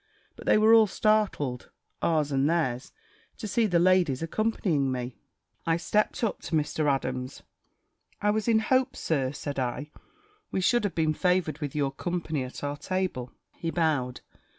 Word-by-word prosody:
But - - -12
they - - +6
were 215 +1 +6
all 225 -1 +7
startled, 195 - 0 0.3
ours 155 -3 +1
and 135 +2 +2
theirs, 145 -6 -1 0.5
to 220 - -5
see 225 +2 +2
the 175 -4 +2
ladies 175 -5 +3
accompanying 165 -7 0
me. 125 -3 -4 0.5
I 165 0 +3
stept 210 - 0
up 220 - -1
to 165 - -3
Mr. 150 -1 +1
Adams. 130 -1 -3 0.8
"I 210 - +2
was 215 +1 -1
in 230 -1 +5
hopes. 260 +3 +1
Sir," 135 -5 0
said 145 -1 -5
I, 130 +4 -3 0.6
"we - - -1
should 225 +5 +2
have 200 - -2
been 155 -2 +2
favoured 180 -3 +1
with 145 -3 -4
your 140 -2 +1
company 160 -1 -3
at 130 +2 -8
our 145 0 -2
table." 185 -9 -2 0.2
He 165 - -4
bowed. 150 -7 0
160 Hz, 165 wpm, -27 LUFS, 140-195 Hz, 0.8 s, all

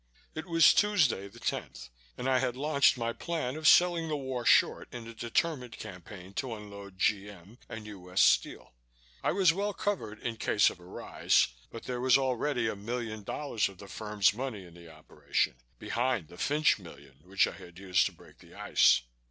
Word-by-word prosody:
It 155 +3 -6
was 165 -1 +6
Tuesday, 165 - +2
the 100 - -15
10th, 65 - -4 0.3
and 125 - -3
I 130 -1 +3
had 125 -1 -1
launched 140 -1 +3
my 115 -1 -2
plan 155 -5 -3
of 155 0 0
selling 175 -2 +5
the 155 -1 -2
war 130 -3 -4
short - - +3
in 120 -1 -8
a 115 - -9
determined 125 +2 -2
campaign 95 -1 -10
to 125 -4 -5
unload 100 -2 -11
G.M. 100 +1 -2
and 110 -1 -7
U.S. 90 -3 -5
Steel. - - +2 0.5
I - - +1
was 185 -3 +4
well 200 +2 -2
covered 115 - -3
in 115 0 -5
case 105 -1 +3
of - - -14
a 90 - -15
rise, 90 - +1 0.2
but 115 - -9
there 125 -1 -4
was 130 0 +5
already 130 -2 0
a 110 - -2
million 110 +1 -5
dollars 115 +1 -2
of 95 - -14
the 100 - -11
firm's 105 -2 +1
money 115 -5 -5
in 85 - -15
the 85 -1 -14
operation, 75 -4 -2 0.2
behind 120 - -1
the 90 - -13
Fynch 150 -3 +2
million 70 -7 -14
which 95 +4 +2
I - - -4
had 85 0 -13
used 95 -1 +2
to - - -7
break - - -19
the - - -17
ice. - - +4
115 Hz, 190 wpm, -30 LUFS, 100-135 Hz, 0.5 s, was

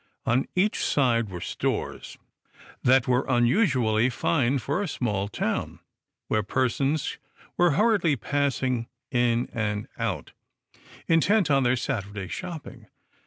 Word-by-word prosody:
On 125 +3 +1
each 200 +4 +1
side 115 -6 +2
were 90 -2 -6
stores, - - -3 0.6
that 130 0 +4
were 125 +1 +2
unusually 125 - +3
fine 135 +1 +1
for 140 - -2
a 205 - -2
small 105 - -2
town, 105 - -2 0.5
where 110 - +1
persons 130 +6 -1 0.4
were 175 -3 +3
hurriedly 205 -8 +3
passing 130 -3 -1 0.2
in 120 -1 +2
and 105 -2 -2
out, - - -3 0.8
intent 170 +2 +3
on 135 -1 +4
their 125 0 +3
Sat 120 -5 -2
urday 100 -2 -7
shopping. 170 -4 -7
130 Hz, 120 wpm, -26 LUFS, 115-150 Hz, 0.8 s, that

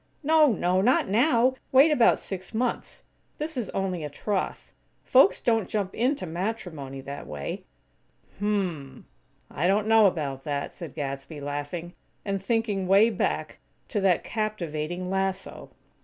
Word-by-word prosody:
"No, 310 +1 +5
no! 185 -2 +1
Not 250 +6 +3
now! 245 +3 +3 0.2
Wait 275 +4 +6
about 245 -6 +5
six 190 +3 -7
months. 240 +1 -2 0.3
This 305 +1 -4
is 240 -5 -3
only 185 -4 -2
a 150 - -4
troth. 190 +7 -3 0.3
Folks - - +5
don't 225 -6 +1
jump 200 -3 -2
into 250 -3 0
matrimony, 165 - -4
that 140 +1 -8
way." 75 -1 -5 0.7
"Hm 205 - -1
m 200 -3 +1
m! 135 -4 -11 0.5
I 160 +5 0
don't 200 +2 +2
know 220 -1 +6
about 140 -7 -3
that," 145 -2 -3
said 165 -6 -9
Gadsby, 140 +1 -5
laughing; 145 +5 -5 0.3
and 195 -1 -2
thinking 210 -3 0
way 200 +5 +5
back 205 - -2 0.3
to 210 - -1
that 190 -3 +3
captivating 180 -5 -3
lasso! 190 0 -3
190 Hz, 145 wpm, -26 LUFS, 155-220 Hz, 0.7 s, Wait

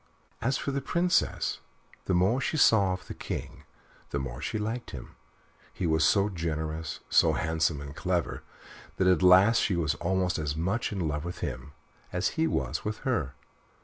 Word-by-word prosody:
As 130 +4 +1
for 140 - -3
the 140 0 -2
Princess, 175 +4 +1 0.5
the 95 - +1
more 100 +9 +3
she 155 - -1
saw 100 -9 +5
of 90 - -7
the - - -7
King - - -6 0.4
the - - -2
more - - -5
she - - -2
liked 110 +3 -3
him; 65 - -9 0.6
he 90 - -4
was 80 -1 +2
so 100 -1 +4
generous, 80 -4 -4
so - - +4
handsome 80 -2 0
and 70 0 -8
clever, 90 -6 -1 0.6
that 95 - +2
at 90 0 +4
last 95 +5 +6
she 95 - +1
was 80 -3 +1
almost 90 -1 0
as 75 -1 -2
much 95 +9 -1
in 95 -5 -2
love 75 0 -2
with 85 +1 -6
him 65 +3 -6 0.4
as 90 +1 0
he 160 0 0
was - - -2
with 105 0 -3
her. 95 - -1
90 Hz, 180 wpm, -28 LUFS, 80-105 Hz, 0.6 s, last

